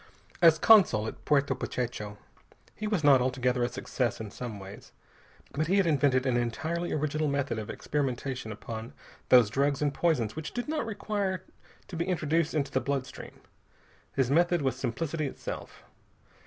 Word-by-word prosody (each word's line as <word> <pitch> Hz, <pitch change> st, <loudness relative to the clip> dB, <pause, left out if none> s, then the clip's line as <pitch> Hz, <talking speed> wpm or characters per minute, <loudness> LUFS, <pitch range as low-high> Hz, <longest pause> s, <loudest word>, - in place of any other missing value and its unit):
As 165 Hz, -2 st, +7 dB
consul 165 Hz, -, +6 dB
at -, -, -7 dB
Puerto 140 Hz, -2 st, +3 dB
Pachecho 110 Hz, -4 st, -4 dB, 0.6 s
he 215 Hz, -, -4 dB
was 205 Hz, -7 st, 0 dB
not 140 Hz, -3 st, +6 dB
altogether 125 Hz, 0 st, 0 dB
a 120 Hz, -, +1 dB
success 125 Hz, 0 st, -2 dB
in 110 Hz, -2 st, -6 dB
some 115 Hz, -3 st, -6 dB
ways, 95 Hz, +1 st, -11 dB, 0.6 s
but 155 Hz, +2 st, -1 dB
he 190 Hz, +3 st, +3 dB
had 195 Hz, -, +4 dB
invented 140 Hz, -5 st, +2 dB
an 125 Hz, -2 st, +2 dB
entirely 160 Hz, +9 st, -2 dB
original 155 Hz, +1 st, 0 dB
method 140 Hz, -4 st, -1 dB
of 105 Hz, -, -7 dB
experimentation 130 Hz, -4 st, -3 dB
upon 110 Hz, +2 st, -7 dB, 0.4 s
those 120 Hz, -5 st, +6 dB
drugs 140 Hz, +2 st, +1 dB
and 145 Hz, -2 st, 0 dB
poisons 135 Hz, -8 st, +1 dB
which 155 Hz, -1 st, -6 dB
did 245 Hz, +2 st, -3 dB
not 300 Hz, -6 st, -2 dB
require 205 Hz, -3 st, -2 dB, 0.4 s
to 180 Hz, -, -8 dB
be 170 Hz, +1 st, -1 dB
introduced 165 Hz, -3 st, 0 dB
into 145 Hz, -2 st, 0 dB
the 130 Hz, -, +1 dB
blood 140 Hz, -2 st, -1 dB
stream. 130 Hz, -, -11 dB, 0.7 s
His 135 Hz, -2 st, +1 dB
method 175 Hz, +1 st, +3 dB
was 130 Hz, -1 st, +1 dB
simplicity 145 Hz, +5 st, -2 dB
itself. -, -, -7 dB
140 Hz, 165 wpm, -29 LUFS, 125-165 Hz, 0.7 s, As